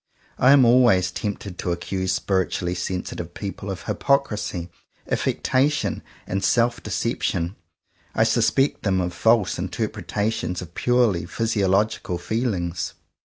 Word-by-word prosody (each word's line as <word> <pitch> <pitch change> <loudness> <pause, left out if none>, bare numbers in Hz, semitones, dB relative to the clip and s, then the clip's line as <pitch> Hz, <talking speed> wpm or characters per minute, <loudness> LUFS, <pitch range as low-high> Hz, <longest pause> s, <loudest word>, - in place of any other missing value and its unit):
I 130 - +6
am 140 -3 +7
always 115 -7 +5
tempted 100 -2 -5
to 90 - -1
accuse 95 +2 -2
spiritually 95 -2 0
sensitive 90 -1 -4
peo 100 -2 -4
ple 100 - -8
of 95 -1 -5
hypocrisy, 105 -11 0 0.4
affectation, 140 +3 0 0.2
and 95 +1 -2
self 120 0 +2
de - - -7
ception. 85 +2 -1 0.6
I - - +4
suspect 135 +2 +2
them 95 -3 +1
of 90 -1 -2
false 110 -1 +3
interpre 105 +3 -3
tations 105 -3 -1
of 90 -2 -9
purely 120 -9 +2
physiological 100 -3 0
feelings. 90 -3 -2
100 Hz, 125 wpm, -23 LUFS, 90-115 Hz, 0.6 s, am